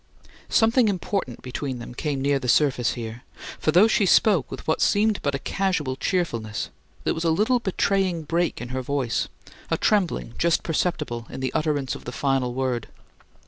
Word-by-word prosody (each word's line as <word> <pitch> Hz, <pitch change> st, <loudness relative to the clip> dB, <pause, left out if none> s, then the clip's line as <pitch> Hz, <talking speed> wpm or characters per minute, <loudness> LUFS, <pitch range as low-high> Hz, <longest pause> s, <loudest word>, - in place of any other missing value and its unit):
Something 225 Hz, +1 st, +4 dB
important 190 Hz, -, -2 dB
between 130 Hz, +1 st, -4 dB
them 120 Hz, 0 st, -8 dB
came 140 Hz, +1 st, -2 dB
near 140 Hz, 0 st, +2 dB
the 125 Hz, -, -5 dB
surface 125 Hz, -1 st, +3 dB
here, 115 Hz, 0 st, -6 dB, 0.4 s
for 155 Hz, -, +2 dB
though 180 Hz, +7 st, +6 dB
she 210 Hz, -3 st, +2 dB
spoke 180 Hz, -, +4 dB
with 135 Hz, -, -8 dB
what 160 Hz, -, +1 dB
seemed 210 Hz, 0 st, +3 dB
but 140 Hz, -1 st, 0 dB
a -, -, 0 dB
casual 165 Hz, -4 st, -1 dB
cheerfulness, 115 Hz, -, -2 dB, 0.3 s
there -, -, +1 dB
was 160 Hz, -, -3 dB
a 165 Hz, -, +2 dB
little 215 Hz, +10 st, +3 dB
betraying 190 Hz, -4 st, 0 dB
break 170 Hz, +3 st, 0 dB
in 120 Hz, +1 st, -6 dB
her 130 Hz, +1 st, -2 dB
voice, 130 Hz, -2 st, -1 dB, 0.4 s
a -, -, +1 dB
trembling 185 Hz, -, +1 dB
just 170 Hz, -1 st, +2 dB
perceptible 150 Hz, -8 st, -1 dB
in -, -, -7 dB
the 130 Hz, -1 st, -2 dB
utterance 145 Hz, -4 st, 0 dB
of -, -, -9 dB
the 125 Hz, -, -4 dB
final 130 Hz, -2 st, 0 dB
word. 130 Hz, -3 st, -1 dB
145 Hz, 180 wpm, -24 LUFS, 125-185 Hz, 0.4 s, though